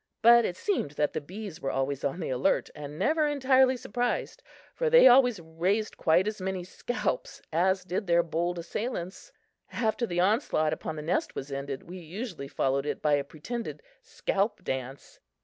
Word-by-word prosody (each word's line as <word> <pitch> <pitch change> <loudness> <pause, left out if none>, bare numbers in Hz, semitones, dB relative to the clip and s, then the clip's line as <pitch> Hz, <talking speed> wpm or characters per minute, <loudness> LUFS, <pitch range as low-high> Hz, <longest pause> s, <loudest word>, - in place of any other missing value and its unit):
But 235 0 +8
it 180 - -3
seemed 390 - -1
that 150 0 0
the - - -2
bees 185 +2 -8
were 135 - -1
always 135 +1 -2
on 140 +5 -1
the 160 - -3
alert 130 +1 +1
and 145 0 -8
never 305 - +2
entirely 265 -2 +3
surprised, 245 - -2 0.3
for - - 0
they 485 - +8
always 245 -4 +6
raised 175 +6 -1
quite 170 +5 +3
as 215 -2 -3
many 190 -1 -2
scalps 245 - -3
as 190 +3 +2
did 185 +2 -3
their 170 0 +4
bold 175 +2 -2
assailants! 185 +1 -5 0.4
After 235 0 0
the 175 -2 -2
onslaught 185 - +2
upon 160 - -5
the 150 - -6
nest 165 - -1
was 135 +1 -6
ended, 140 0 -4
we 180 +2 -8
usually 175 - -6
followed 135 +1 0
it - - -2
by 150 -1 +2
a 145 -1 +2
pretended 230 - -6 0.2
scalp 220 - -2
dance. 130 +1 -5
180 Hz, 175 wpm, -28 LUFS, 150-235 Hz, 0.4 s, But